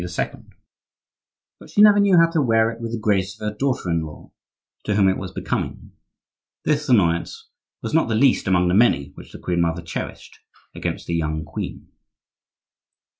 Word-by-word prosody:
But - - -14
she - - -3
never 205 -1 +7
knew 200 -3 +4
how 165 - +7
to 165 -2 +1
wear 115 -3 +3
it 115 0 -11
with 115 -1 -4
the 115 - -2
grace 100 -2 -1
of 105 - -4
her 105 - -4
daughter 130 -3 -1
in 85 -1 +1
law, 80 -1 -10 0.5
to 105 - 0
whom 100 -2 +4
it 95 - +2
was 95 -2 -6
becoming. - - -4 0.7
This 150 -1 0
annoyance 85 -8 +1 0.3
was - - -4
not 160 - +3
the 115 - 0
least 130 -1 +3
among 90 -1 +3
the 90 - +1
many 95 - +3
which - - -13
the - - -9
queen 90 -1 -1
mother 85 0 -1
cherished 85 - -7 0.3
against - - -4
the 85 - -4
young 80 -1 -2
queen. 80 - -7
105 Hz, 175 wpm, -22 LUFS, 85-125 Hz, 0.7 s, never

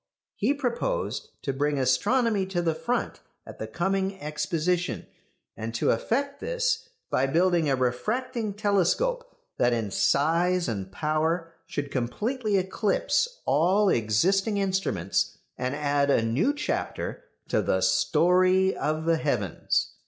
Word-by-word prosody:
He 255 +8 +1
proposed 440 - -2
to 135 - -1
bring 145 +2 0
astronomy 200 - +2
to 175 -2 -1
the 165 -1 +1
front 240 +10 -2 0.3
at - - -11
the - - -4
coming 190 +2 -1
Exposition, 165 +3 -1 0.5
and 115 +1 -5
to - - +2
effect 280 - -1
this - - -1 0.2
by 135 - +2
building 170 +1 +2
a 135 - +3
refracting 215 - -1
telescope 215 - +1 0.3
that 120 0 +3
in 110 -4 -2
size 170 - +2
and 100 -5 -4
power 160 - -1
should 145 -1 -4
completely 210 - -1
eclipse 210 - 0
all 190 +7 +3
existing 190 - +2
instruments 190 - 0 0.2
and 130 +2 -2
add 145 -1 +1
a 120 - +3
new 125 - +2
chapter 295 0 -3 0.2
to - - +2
the - - 0
"story 185 +2 +3
of 155 +1 -2
the 165 0 +3
heavens." 125 - -1
180 Hz, 130 wpm, -26 LUFS, 140-210 Hz, 0.5 s, a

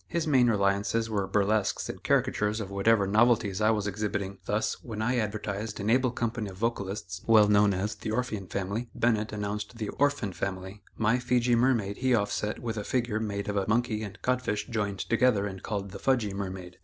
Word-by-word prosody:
His 170 -1 -1
main 130 -5 +4
reliances 100 +2 +1
were 100 -3 0
burlesques 105 +1 +1
and - - -7
caricatures 105 +1 +1
of 100 -3 -5
whatever 100 +1 +3
novelties 110 -1 +3
I 110 - +4
was 105 -2 +1
exhibiting; 100 -1 -3
thus, 110 +2 -1
when 110 -3 -6
I 120 +3 +1
advertised 105 -1 -3
an 105 +2 0
able 130 +1 +3
company 115 -3 -3
of 95 - -11
vocalists, 100 -4 -3
well 110 -2 +7
known 105 0 +5
as 100 +3 -1
the - - -6
Orphean 110 -4 -2
Family, 100 +6 -3
Bennett 110 -2 +1
announced 105 +2 -4
the 110 -2 -3
"Orphan 145 -8 0
Family;" 95 +2 -5 0.2
my 110 +3 +2
Fejee 125 0 +2
Mermaid 115 -5 +2
he 130 -1 +2
offset 105 0 -1
with 115 -2 -4
a 105 - -2
figure 120 -2 -1
made 100 -2 -3
of 105 -1 -1
a 95 - 0
monkey 115 0 +1
and 100 -3 -7
codfish 125 -5 0
joined 105 -4 -2
together 110 0 +2
and 95 -2 -6
called 100 -2 -4
the 100 - -8
"Fudg 130 -3 +2
ee 100 -2 -4
Mermaid." 95 -2 -6
105 Hz, 195 wpm, -28 LUFS, 100-115 Hz, 0.2 s, well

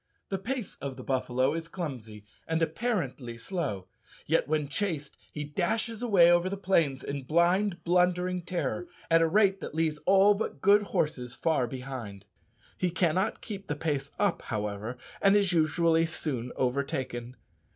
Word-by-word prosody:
The 195 - -2
pace 240 +2 -4
of 135 -1 -6
the 130 - -8
buffalo 130 +1 +1
is 165 0 -4
clumsy, 125 - -6 0.2
and 160 0 0
apparently 160 - -2
slow, 125 - -3 0.4
yet, - - +2
when 150 -1 0
chased, 150 -2 -2 0.2
he 150 - -4
dashes 220 +9 -1
away 190 -8 +6
over 175 +1 +3
the 200 - -3
plains 165 -8 +1
in 140 0 -4
blind 175 +5 +2
blundering 180 +1 +2
terror, 175 0 -3 0.2
at 165 0 +6
a 165 - +4
rate 195 +2 +3
that - - -6
leaves 160 -2 0
all 195 +2 +6
but 205 -8 -4
good 200 +6 +5
horses 125 -10 -2
far 150 -5 +1
behind. 120 -6 -7 0.5
He 180 - +1
cannot 180 +3 0
keep 200 -3 -7
the 150 - -2
pace 145 -2 -2
up, 205 -4 +1
however, 105 +2 -4 0.2
and 195 0 +5
is 200 -3 +3
usually 165 0 +3
soon 130 -7 -3
overtaken. 130 -2 -2
165 Hz, 155 wpm, -29 LUFS, 135-185 Hz, 0.5 s, away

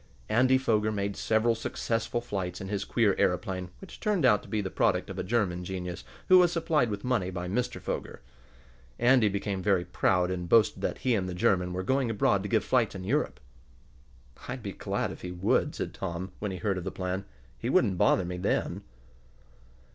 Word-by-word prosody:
Andy 130 +3 +4
Foger 110 -4 +1
made 100 -1 -2
several 110 +1 +2
successful 115 +1 -2
flights 95 -6 -4
in 95 - -6
his 100 -1 -2
queer 110 -5 +2
aeroplane, 90 -1 0
which 195 - -11
turned 200 -9 +1
out 105 -5 +5
to - - -15
be 110 - -1
the 95 -2 -3
product - - +1
of - - -6
a - - -1
German 90 -4 0
genius 90 -1 -5 0.2
who 185 0 +8
was 175 -2 +5
supplied 160 -7 +1
with 100 -1 -4
money 120 -8 0
by 90 -1 -4
Mr. 120 +7 -2
Foger. - - -5 0.8
Andy 120 -3 +4
became 100 -1 -2
very 95 -2 +2
proud, 90 0 +1
and 90 -1 -4
boasted 115 +1 +4
that - - -1
he 125 - +1
and 95 -4 0
the 90 - -5
German 90 0 +2
were 90 +1 -3
going 130 +3 +1
abroad 100 -2 +2
to 100 - -5
give 110 -2 +2
flights 120 -6 +2
in 95 - -6
Europe. 140 +11 -1 1.1
"I'd 125 -1 -5
be 100 - -4
glad - - -2
if - - -10
he 90 - -5
would," 90 +2 +1
said - - -4
Tom, 95 0 -5
when 105 - -2
he 95 - -4
heard 95 +1 -1
of - - -7
the 95 - -3
plan. 95 +1 -3 0.4
"He - - -2
wouldn't 95 -3 +2
bother 105 -2 +4
me 90 +1 -4
then." 90 - -1
100 Hz, 200 wpm, -28 LUFS, 90-115 Hz, 1.1 s, who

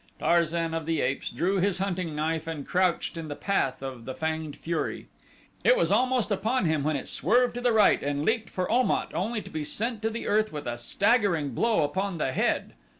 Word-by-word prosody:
Tarzan 170 -1 +1
of 165 -1 -3
the 165 -2 0
Apes 135 +2 -1
drew 190 +3 0
his 190 0 +1
hunting 180 -4 -2
knife 160 +1 -1
and 155 -4 -5
crouched 180 -2 +1
in 165 -1 -5
the 145 - -5
path 140 -10 -1
of 130 -4 -6
the 130 - -5
fanged 160 0 -3
fury. 170 0 -3 0.5
It - - +5
was - - +2
almost 250 -4 +2
upon 225 +4 +1
him 160 -2 +1
when 155 +2 0
it 135 - -4
swerved 245 +2 +2
to 245 - -5
the 245 -1 +3
right 220 -2 +4
and 145 +1 -2
leaped 225 0 0
for 185 -1 -2
Om 250 +2 +3
at - - -1
only 210 +6 -2
to - - -10
be 155 -1 -3
sent 220 +8 -2
to 225 +1 -2
earth 215 +1 +2
with 150 -1 -6
a 120 0 -4
staggering 185 - +2
blow 215 - +2
upon 190 +5 -2
the 135 -4 -1
head. - - 0
170 Hz, 210 wpm, -27 LUFS, 150-215 Hz, 0.5 s, It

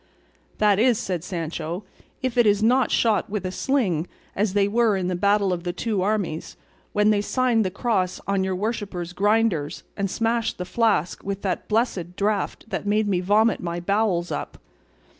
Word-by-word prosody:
"That 205 -2 +3
is," 240 0 +4
said 180 -6 -3
Sancho, 170 +1 -4 0.4
"if 255 -2 -1
it 240 -2 +4
is 205 +1 +3
not 250 +1 +4
shot 220 -3 +2
with 200 -2 -3
a 185 - -2
sling 185 - 0 0.3
as 200 -1 0
they 200 -1 +3
were 220 -1 +2
in 180 -1 -1
the 180 - -1
battle 200 0 +2
of 170 -1 -4
the 175 -1 -2
two 205 +2 -1
armies, 195 -5 -2 0.3
when 210 +1 +3
they 205 -1 +2
signed 245 0 +2
the 185 - 0
cross 190 -2 -1
on 195 -1 +1
your 190 0 -1
worship's 200 -4 -3
grinders 205 -6 +1
and 200 -1 -1
smashed 230 +2 0
the 180 - -4
flask 200 -4 +1
with 200 0 -4
that 185 -3 -2
blessed 200 -6 -1
draught 205 0 -1
that - - -3
made 210 +1 +2
me 190 -3 +1
vomit 210 +4 +3
my 170 0 -3
bowels 190 -1 0
up." - - -4
200 Hz, 180 wpm, -24 LUFS, 180-220 Hz, 0.4 s, is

